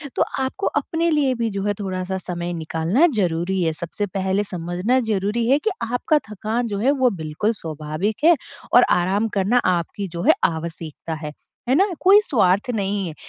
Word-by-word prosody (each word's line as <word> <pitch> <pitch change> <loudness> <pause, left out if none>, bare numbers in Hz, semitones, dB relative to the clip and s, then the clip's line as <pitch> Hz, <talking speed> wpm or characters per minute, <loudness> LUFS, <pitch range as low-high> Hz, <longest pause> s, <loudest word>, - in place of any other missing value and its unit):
तो - - 0 0.2
आपको 265 +9 -2
अपने 335 +1 0
लिए 285 -4 +2
भी 230 -1 -1
जो 195 -1 -4
है 205 0 +1
थोड़ा-सा 190 -1 -3
समय 175 -1 -4
निकालना 165 - +1
ज़रूरी 180 -1 0
है। 160 -2 +1
सबसे 170 +6 -4
पहले 190 +1 -1
समझना 180 +6 -1
ज़रूरी 210 +3 0
है 275 - +5
कि 440 - 0 0.2
आपका 245 +5 +2
थकान 220 +3 -2
जो 205 -2 -3
है 255 +6 +3
वो 255 - +5
बिल्कुल 165 +3 -2
स्वाभाविक 160 - -4
है 340 +2 +7 0.4
और 245 - +8
आराम 190 +5 +2
करना 200 +5 +2
आपकी 180 +3 -1
जो 170 -1 -6
है - - +6
आवश्यकता 165 -1 -3
है, 155 -1 -6 0.4
है 260 - +4
ना? 390 +7 +4
कोई 390 +3 +7
स्वार्थ 205 -1 +2
नहीं 200 -2 -1
है। 160 - -6
195 Hz, 180 wpm, -22 LUFS, 170-235 Hz, 0.4 s, और